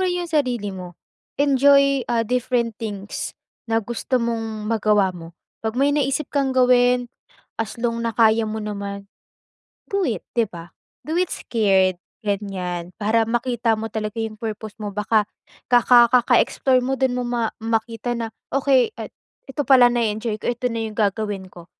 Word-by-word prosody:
rin 355 -1 -1
yung 335 - -10
sarili 245 -9 0
mo, 180 -2 -9 0.4
enjoy, 275 0 +4
ah, 230 -1 +1
different 245 0 0
things 205 -2 -5 0.3
na 225 -1 +1
gusto 240 +3 -2
mong 225 -2 -2
magawa 210 -3 +2
mo. 170 -1 -11 0.2
'Pag 220 +2 -3
may 280 +2 +3
naisip 280 0 0
kang 270 -2 0
gawin 250 0 +4 0.5
as 225 +1 -4
long 235 -1 -1
na 230 - 0
kaya 225 0 +4
mo 220 0 -3
naman 200 -1 -5 0.8
do 395 -2 0
it, 220 - -2 0.2
di 230 - +4
ba? 170 -3 -11 0.3
Do 315 +6 -3
it 365 -1 0
scared, 190 -5 +2 0.2
ganyan. 185 -4 -3
Para 225 +2 +2
makita 235 0 0
mo 220 +1 -3
talaga 215 +1 -4
yung 220 -1 -5
purpose 220 -1 -6
mo 205 -2 -5
baka 210 +1 +1 0.4
kaka 240 0 +6
kaka-explore 255 +1 +3
mo 265 - 0
don 260 -2 0
mo 250 - -2
ma 240 -2 -1
makita 225 +1 -2
na 230 -1 -3 0.2
okey 275 - +3
at - - -7 0.4
ito 285 +1 -3
pala 255 -3 +7
na-eenjoy 225 -2 -1
ko, 240 - -1
ito 250 +1 -2
na 230 -1 -3
yung 215 - -6
gagawin 205 -2 -1
ko 175 -2 -13
230 Hz, 160 wpm, -22 LUFS, 210-250 Hz, 0.8 s, pala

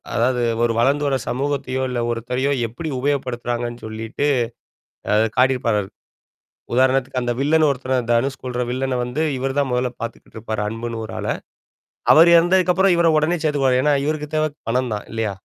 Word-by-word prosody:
அதாவது 120 +1 +1 0.2
ஒரு 120 -1 +2
வளர்ந்து 140 +5 +2
வர 135 -1 +1
சமூகத்தையோ, 135 0 -2
இல்ல 125 -1 -2
ஒருத்தரையோ 125 +4 -1 0.2
எப்படி 140 +8 -6
உபயோகப்படுத்துறாங்கன்னு 120 -3 -2
சொல்லிட்டு 110 +6 -3 0.9
அது 110 +1 +4
காட்டியிருப்பாரு. 125 -6 +2 0.9
உதாரணத்துக்கு, 130 +1 +2
அந்த 120 0 -1
வில்லன்னு 155 +2 +3
ஒருத்தர 130 0 -2 0.2
தனுஷ் 130 +4 0
கொல்ற 125 -1 -4
வில்லனை 130 +1 -1
வந்து, 125 +6 -3 0.2
இவர் 135 +2 -2
தான் 140 - 0
முதல்ல 125 0 0
பாத்துக்கிட்டு 115 -1 -8
இருப்பாரு, 110 -1 -4
அன்புன்னு 115 +1 -4
ஒரு - - -9
ஆள. - - -4 0.8
அவர் 165 +2 +7
இறந்ததுக்கப்புறம் 180 +2 +4
இவர 170 0 +3
உடனே 160 +3 +1
சேத்துக்குவாரு. 135 -4 +2
ஏன்னா, 150 +1 +3
இவருக்கு 150 0 -2
தேவ 155 - +2 0.2
பணம் 125 0 0
தான் 105 - -7
இல்லையா? 110 -2 -1
130 Hz, 150 wpm, -21 LUFS, 120-145 Hz, 0.9 s, அவர்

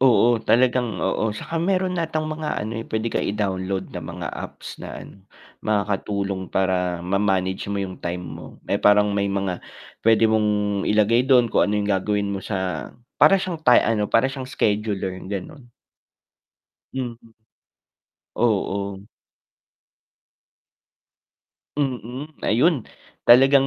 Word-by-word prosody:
Oo, 120 -2 +5
talagang 125 -1 +2
oo. 110 -1 0
'Tsaka 165 +10 -5
meron 185 +2 +1
atang 160 -2 -1
mga 155 0 -3
ano 110 +2 -4
eh, 115 - -4
pwede 110 +1 -2
ka - - -3
i-download 95 -2 -1
na - - -6
mga - - -6
apps - - -7
na - - -8
ano, 100 -1 -13 0.4
makakatulong 100 -2 -1
para 90 -2 +1
ma-manage 95 0 0
mo 100 - -1
yung 95 -1 -4
time 90 +1 -4
mo. 90 - -10
May - - +2
parang 105 0 +5
may 100 - +1
mga, 100 -2 -1 0.5
pwede 115 0 +5
mong 105 -2 +1
ilagay 110 +3 +3
dun 125 -3 +5
kung - - +3
ano 105 0 0
yung 100 - -2
gagawin 100 +1 0
mo 100 -1 -4
sa 95 -3 -3 0.2
para 195 -1 +6
siyang 185 -2 -3
ti 130 -6 +5
ano, 110 -2 +1
para 115 +5 +3
siyang 135 -1 -6
scheduler, 105 -6 -1 0.2
ganon. 120 +6 -7 1.2
Mm, 125 -3 -3 1.2
oo. 100 -3 0 2.8
Mm, 135 +1 -3
ayun. 135 +3 +2 0.4
Talagang 135 +3 +7
105 Hz, 130 wpm, -23 LUFS, 100-125 Hz, 2.8 s, Talagang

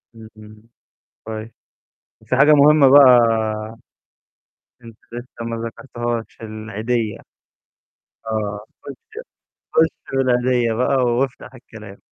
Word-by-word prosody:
إمم. 110 -1 -15 0.6
كوي 110 +1 -7 0.7
وفي 125 - -2
حاجة 150 +3 +5
مهمة 145 -1 +6
بقى 140 -1 +8 1.8
أنت 115 -2 -13 0.2
لسّه 120 -1 -8
ما 115 0 -4
ذكرتهاش، 120 -1 -6
العيديّة 110 +1 -4 1.1
آه، 105 -2 -3 0.2
خُش 145 - -11 0.6
خش 160 0 +4 0.3
بالعيديّة 125 -2 +1
بقى 125 +3 0
وافتح 125 +1 -1
الكلام. 110 -5 -13
120 Hz, 90 wpm, -20 LUFS, 110-130 Hz, 1.8 s, بقى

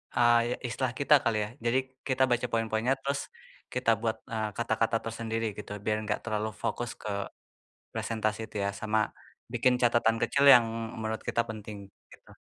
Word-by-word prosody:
eee, 120 0 +4
istilah 125 +1 -1
kita 140 +2 +4
kali 110 - +1
ya. 105 - -5 0.2
Jadi 120 +2 +3 0.3
kita 130 -1 +2
baca 120 +1 +2
poin-poinnya, 115 +2 +1
terus 140 +1 -1 0.5
kita 125 -2 0
buat, 110 -1 0
eee, 110 -1 -1
kata-kata 115 0 +1
tersendiri 115 0 -3
gitu, 105 - -8
biar 110 0 +1
enggak 105 0 -1
terlalu 110 -1 -1
fokus 120 -1 -1
ke 110 - -5 0.8
presentasi 110 -1 -1
itu - - -11
ya, - - +1
sama 110 0 +1 0.5
bikin 125 +1 +3
catatan 120 -1 +4
kecil 140 0 +2
yang 120 -1 +6 0.3
menurut 110 0 -3
kita 115 - +2
penting, 105 -1 -7 0.4
gitu. - - -17
115 Hz, 160 wpm, -29 LUFS, 110-120 Hz, 0.8 s, yang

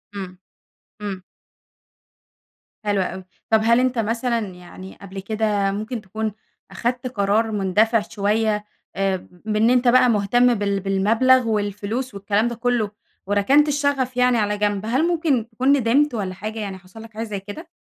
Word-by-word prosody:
امم. 185 -2 -7 0.6
امم. 200 -3 -4 1.6
حلو 205 -2 +1
أوي، 185 0 -4 0.3
طب 220 -1 +4
هل 235 +2 +4
أنتَ 255 -1 +1
مثلًا 230 +2 0
يعني 185 +1 -11
قبل 195 0 -8
كده 205 -1 0
ممكن 215 +4 -4
تكون 215 +2 -4 0.4
أخدت 245 +1 -2
قرار 220 -1 +1
مندفع 210 +3 +2
شوية 210 0 0 0.3
آآ، 195 -2 -1 0.2
بإن 215 +1 +2
أنتَ 250 0 +3
بقى 250 +1 +6
مهتم 240 +3 +3
بال 200 -2 -1
بالمبلغ 225 +6 +3
والفلوس 210 +3 -2
والكلام 200 +3 0
ده 235 - -3
كله، 235 -3 0 0.4
وركنت 235 +10 +4
الشغف 280 -3 0
يعني 250 -1 +4
على 210 -1 0
جنب؟ 205 0 -1
هل 260 +9 +1
ممكن 305 -9 0
تكون 250 +4 +1
ندمت 275 +4 +2
والّا 195 -5 -3
حاجة 215 +4 -6
يعني 200 -3 -5
حصل 185 +4 -14
لَك 225 0 -13
حاجة 220 +1 -4
زي 210 -3 -4
كده؟ 205 - -9
220 Hz, 150 wpm, -22 LUFS, 200-245 Hz, 1.6 s, بقى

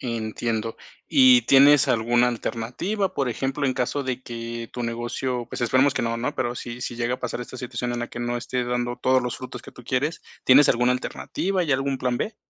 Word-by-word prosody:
Entiendo. 115 -1 -3 0.3
¿Y 260 -3 +6
tienes 140 +1 +6
alguna 120 0 +3
alternativa?, 125 - -2
por 135 -3 0
ejemplo, 135 +4 -2
en 130 - +1
caso 140 +3 -1
de 130 -1 -3
que 115 -1 -6
tu 120 - -4
negocio, 120 +1 -3
pues - - -6
esperemos 130 +4 +3
que - - -2
no, 115 0 -1
¿no?, 125 +5 -2
pero 120 -1 -1
sí 120 0 -7
sí 120 - -4
llega 120 +1 -1
a - - -10
pasar 125 0 -3
esta 125 +1 -8
situación 125 -1 -4
en 120 - -3
la 120 - -2
que 120 - -7
no 120 0 -1
esté 125 +1 -2
dando 120 0 -1
todos 130 0 +2
los 125 -1 -3
frutos 125 -1 -8
que - - -13
tú - - -13
quieres, 135 +6 -1 0.2
¿tienes 135 +2 +7
alguna 125 0 +3
alternativa? 185 +8 -2
¿Hay 155 -5 0
algún 135 0 0
plan 125 -1 0
B? 215 - -3
125 Hz, 215 wpm, -24 LUFS, 120-135 Hz, 0.3 s, tienes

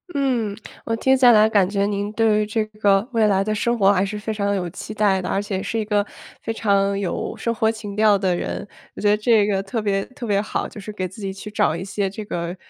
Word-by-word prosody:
嗯， 240 -7 0 0.3
我 225 - 0
听 265 +3 +3
下 245 -2 +7
来 215 0 +5
感 195 -4 +3
觉 200 -1 0
您 205 0 -2
对 220 -2 +3
于 210 - +1
这 215 +1 -1
个 210 -1 +1
未 225 -3 +3
来 195 -1 +2
的 215 +1 -1
生 235 +3 0
活 200 -1 +5
还 195 0 +2
是 210 +1 -5
非 220 +1 -4
常 200 -1 -2
地 200 - +1
有 180 -2 -2
期 205 +4 -8
待 200 -3 +2
的， - - -5
而 200 - -1
且 190 -2 -3
是 225 - -3
一 220 - 0
个 205 -1 +1 0.4
非 225 - -3
常 200 -2 +1
有 195 -3 -3
生 230 - -2
活 220 0 +1
情 215 -2 -5
调 210 -1 +4
的 190 -2 0
人， 175 - -4 0.3
我 - - -7
觉 205 - +3
得 210 - +4
这 215 -1 +3
个 195 -2 0
特 220 +3 -3
别 195 -1 0
特 255 -2 -9
别 200 -2 +1
好， 215 - -3
就 210 - -9
是 210 +2 -8
给 185 -2 -3
自 190 - -13
己 195 -1 -3
去 210 +2 -9
找 165 -6 +1
一 175 - -5
些 200 0 -2
这 210 +2 -7
个 175 -2 -4
205 Hz, 290 characters per minute, -22 LUFS, 195-220 Hz, 0.4 s, 下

